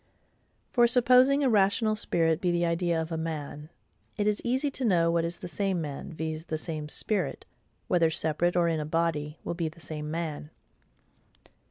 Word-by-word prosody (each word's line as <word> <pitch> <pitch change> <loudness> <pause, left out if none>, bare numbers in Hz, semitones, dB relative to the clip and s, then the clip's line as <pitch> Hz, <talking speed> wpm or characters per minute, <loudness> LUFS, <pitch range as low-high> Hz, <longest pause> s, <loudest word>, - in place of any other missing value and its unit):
For, 240 -2 +5
supposing 255 +3 +5
a - - +3
rational 215 +2 +3
spirit 165 -5 +1
be 180 - +1
the 175 0 +1
idea 170 0 0
of 160 +1 -4
a 165 - -2
MAN, 155 -2 -5 0.5
it 205 - 0
is 210 0 +1
easy 260 +4 0
to 265 - -5
know 170 -7 +3
what 170 0 +1
is 170 +1 -3
the - - -7
same 195 0 -1
man, 145 -1 -5
viz. 160 0 -4
the 160 -2 -3
same 155 -2 -5
spirit—whether 175 -1 -1
separate 160 +2 0
or 175 -1 +3
in 165 -1 0
a - - -2
body—will 155 -1 -2
be 170 -1 -2
the 165 +2 -17
SAME 155 -1 -5
MAN. 155 -2 -4
170 Hz, 175 wpm, -28 LUFS, 160-200 Hz, 0.5 s, For